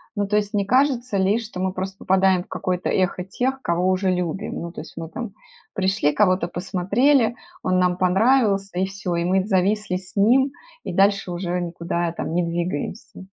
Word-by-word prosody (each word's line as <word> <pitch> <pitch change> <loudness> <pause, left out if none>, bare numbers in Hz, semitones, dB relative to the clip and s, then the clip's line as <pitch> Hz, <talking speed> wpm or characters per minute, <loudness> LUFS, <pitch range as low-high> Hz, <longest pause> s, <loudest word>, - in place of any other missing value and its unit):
Ну, 205 -1 0
то 210 - 0
есть 205 0 -1
не 200 - +2
кажется 255 -2 +2
ли, 195 +4 +2
что 220 -5 -7
мы 185 0 -1
просто 190 +1 -5
попадаем 190 -1 +2
в - - -25
какое-то 180 -1 -2
эхо 185 -1 0
тех, 260 +8 -2
кого 175 +2 +1
уже 185 0 +1
любим? 180 +2 -3
Ну, 170 - -5
то 160 - -7
есть - - -12
мы 165 -1 -6
там 235 -2 -6 0.4
пришли, 190 -5 +1
кого-то 185 +1 +2
посмотрели, 210 +9 +1 0.3
он 185 0 +2
нам 180 0 +2
понравился- 195 0 +2
и 190 - +2
всё. 195 -2 -4
И 170 0 0
мы 185 +1 +2
зависли 200 0 +1
с 185 -1 -13
ним, 250 +7 +4 0.3
и - - -5
дальше 195 -1 +2
уже 175 0 -2
никуда 170 0 -2
там 165 - -4
не 175 +1 +2
двигаемся. 170 +3 -4
190 Hz, 190 wpm, -22 LUFS, 180-210 Hz, 0.4 s, ним